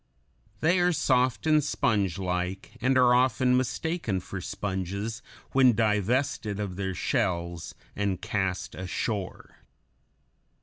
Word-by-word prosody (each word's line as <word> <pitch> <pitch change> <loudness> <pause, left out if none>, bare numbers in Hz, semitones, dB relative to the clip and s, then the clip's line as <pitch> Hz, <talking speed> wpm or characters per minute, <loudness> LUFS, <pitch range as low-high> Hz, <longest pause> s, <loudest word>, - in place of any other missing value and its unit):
They 175 +3 +3
are 175 0 +3
soft 130 -4 +1
and 155 -1 +4
spongelike, 95 - -1
and 130 +2 +3
are 125 -1 +6
often 125 0 +3
mistaken 130 - -1
for 95 +1 -7
sponges 100 +4 -4 0.3
when 130 -2 +5
divested 110 0 0
of 100 -3 -3
their 95 -1 -3
shells 85 - -2 0.2
and 100 -3 -1
cast 95 -2 -2
ashore. 95 +1 -4
105 Hz, 105 wpm, -27 LUFS, 95-130 Hz, 0.3 s, are